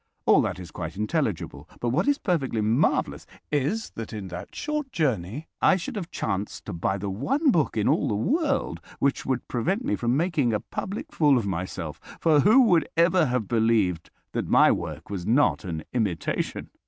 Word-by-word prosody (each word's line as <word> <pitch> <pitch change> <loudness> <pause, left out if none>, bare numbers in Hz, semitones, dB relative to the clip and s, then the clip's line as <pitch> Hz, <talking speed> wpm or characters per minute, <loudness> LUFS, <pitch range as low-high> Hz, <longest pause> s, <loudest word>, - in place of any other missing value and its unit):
All - - +6
that - - -2
is 90 -2 -9
quite 85 0 -6
intelligible. 105 - -2
But 120 - -1
what 150 +10 +1
is 285 -1 +3
perfectly 145 - 0
marvellous 115 +8 +1 0.2
is 150 +10 -1
that 115 -1 -7
in 100 -3 -6
that 90 0 -8
short 300 -3 -3
journey 135 - -1
I - - +5
should 190 +8 -5
have 185 -5 -4
chanced 100 -1 -3
to 105 - -5
buy 85 +3 -1
the 100 +1 -4
one 270 - +1
book 155 - +1
in 105 - +1
all - - +2
the 105 - 0
world 275 - 0 0.2
which 140 0 0
would 130 -2 -1
prevent 190 - -1
me 285 - +1
from 120 +2 0
making 150 -8 +1
a 105 - +1
public 200 - -6
fool 145 -4 +4
of 115 - -1
myself, 90 -1 -4 0.2
for 155 -3 +4
who 220 - +6
would 180 -8 +3
ever 170 -1 +4
have 125 -4 -1
believed 110 -7 +1 0.2
that - - -2
my - - +6
work - - -4
was 95 -3 -4
not 130 +3 +3
an 80 -3 -4
imitation? 100 -10 -2
125 Hz, 190 wpm, -26 LUFS, -, 0.2 s, All